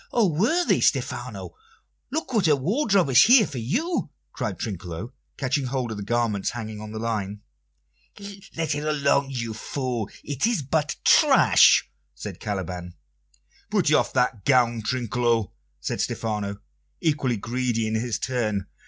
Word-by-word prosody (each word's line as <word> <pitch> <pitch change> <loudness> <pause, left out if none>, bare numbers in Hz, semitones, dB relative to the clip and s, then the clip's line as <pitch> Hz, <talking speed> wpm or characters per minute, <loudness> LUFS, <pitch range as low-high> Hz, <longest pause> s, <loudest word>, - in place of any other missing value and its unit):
O 235 -3 +3
worthy 220 - +2
Stephano! - - -1 0.6
Look 300 -2 -3
what 205 -7 +3
a 150 - +5
wardrobe 195 - +1
is 125 - +7
here 240 -2 +7
for 140 -7 -6
you!" 265 - -1 0.2
cried - - -3
Trinculo, 95 +2 -6 0.2
catching 135 0 -1
hold 125 -2 -2
of 110 - -5
the - - -5
garments 115 -3 0
hanging 110 -3 -6
on 105 0 -8
the 110 - -6
line. 105 -3 -3 1.2
"Let 160 -2 0
it 145 +1 -3
alone, 140 -2 +1
you 115 -4 -4
fool; 120 -1 -3
it 145 - -1
is 225 -11 0
but 150 +2 -1
trash!" - - +6 0.3
said - - -8
Caliban. 90 -3 -5 0.7
"Put - - +2
off - - +3
that 125 -5 +1
gown, 120 -4 +3
Trinculo," 120 -1 0 0.3
said - - -3
Stephano, 105 -3 -2 0.4
equally 145 -7 0
greedy 120 +1 -1
in 110 - -2
his 110 -1 -1
turn. 110 -6 -1
125 Hz, 145 wpm, -24 LUFS, 110-150 Hz, 1.2 s, is